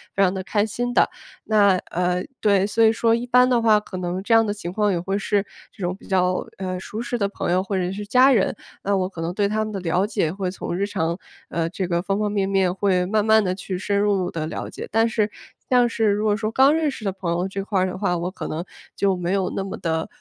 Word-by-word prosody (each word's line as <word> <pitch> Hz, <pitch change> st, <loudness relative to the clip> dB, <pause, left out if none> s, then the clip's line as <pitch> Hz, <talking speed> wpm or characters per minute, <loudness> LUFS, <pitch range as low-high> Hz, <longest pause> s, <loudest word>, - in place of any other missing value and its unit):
非 195 Hz, -, +3 dB
常 185 Hz, -1 st, +3 dB
得 190 Hz, -, -3 dB
开 205 Hz, +2 st, +1 dB
心 245 Hz, +3 st, -3 dB
的。 -, -, +4 dB, 0.3 s
那， 205 Hz, -3 st, +4 dB, 0.2 s
呃 180 Hz, +1 st, 0 dB, 0.2 s
对， 200 Hz, -2 st, +3 dB
所 220 Hz, +2 st, 0 dB
以 220 Hz, -, +5 dB
说 230 Hz, 0 st, +2 dB
一 235 Hz, +2 st, -1 dB
般 250 Hz, +1 st, +5 dB
的 240 Hz, -2 st, +3 dB
话 220 Hz, -2 st, +5 dB
可 205 Hz, -2 st, -6 dB
能 180 Hz, +1 st, -3 dB
这 225 Hz, -, +1 dB
样 225 Hz, 0 st, +6 dB
的 205 Hz, -, -1 dB
情 175 Hz, -4 st, -6 dB
况 210 Hz, +1 st, +1 dB
也 -, -, 0 dB
会 195 Hz, +3 st, -1 dB
是 205 Hz, 0 st, 0 dB, 0.3 s
这 195 Hz, -, -9 dB
种 175 Hz, +1 st, 0 dB
比 -, -, -16 dB
较， 185 Hz, -1 st, +1 dB
呃， 185 Hz, -1 st, -3 dB
舒 210 Hz, +4 st, -6 dB
适 240 Hz, 0 st, -2 dB
的 200 Hz, -3 st, +1 dB
朋 200 Hz, -, -3 dB
友 180 Hz, +1 st, +3 dB
或 195 Hz, +1 st, -3 dB
者 180 Hz, 0 st, -1 dB
是 205 Hz, +2 st, -5 dB
家 255 Hz, +5 st, +5 dB
人， 215 Hz, -7 st, +2 dB, 0.3 s
那 200 Hz, 0 st, +1 dB
我 185 Hz, -1 st, 0 dB
可 175 Hz, -, -11 dB
能 170 Hz, +2 st, -2 dB
对 200 Hz, +1 st, +1 dB
他 215 Hz, 0 st, 0 dB
们 215 Hz, -, -6 dB
的 195 Hz, -, -4 dB
了 180 Hz, +2 st, +1 dB
解 195 Hz, -7 st, 0 dB
会 190 Hz, -1 st, -3 dB
从 180 Hz, -, -5 dB
日 200 Hz, -, +1 dB
常， 170 Hz, -4 st, -2 dB, 0.3 s
呃， 165 Hz, -1 st, -1 dB
这 185 Hz, 0 st, -3 dB
个 170 Hz, -1 st, 0 dB
方 195 Hz, +1 st, -1 dB
方 210 Hz, -1 st, 0 dB
面 200 Hz, -2 st, 0 dB
面 190 Hz, -2 st, +2 dB
会 185 Hz, -2 st, +1 dB
慢 210 Hz, +2 st, +1 dB
慢 220 Hz, -1 st, +5 dB
地 185 Hz, -, 0 dB
去 185 Hz, -1 st, -5 dB
深 200 Hz, +1 st, -1 dB
入 200 Hz, -3 st, +1 dB
的 160 Hz, -2 st, -3 dB
了 160 Hz, -, -5 dB
解。 -, -, -7 dB
但 225 Hz, +1 st, +3 dB
是 215 Hz, -1 st, 0 dB, 0.4 s
像 245 Hz, -1 st, +4 dB
是 225 Hz, -1 st, 0 dB
如 205 Hz, +1 st, +1 dB
果 210 Hz, -1 st, +2 dB
说 215 Hz, -1 st, -2 dB
刚 265 Hz, +5 st, +5 dB
认 320 Hz, -2 st, +1 dB
识 235 Hz, -, -9 dB
的 195 Hz, -, 0 dB
朋 185 Hz, -3 st, -4 dB
友 175 Hz, +2 st, -1 dB
这 195 Hz, +1 st, -4 dB
块 195 Hz, -2 st, 0 dB
的 185 Hz, -, -4 dB
话， 185 Hz, -2 st, 0 dB
我 170 Hz, +1 st, -2 dB
可 -, -, -6 dB
能 160 Hz, +2 st, -3 dB, 0.3 s
就 195 Hz, -2 st, +2 dB
没 175 Hz, 0 st, -2 dB
有 195 Hz, -2 st, +1 dB
那 195 Hz, -, -1 dB
么 195 Hz, -, -5 dB
得， 160 Hz, -1 st, -2 dB
195 Hz, 290 characters per minute, -23 LUFS, 180-215 Hz, 0.4 s, 样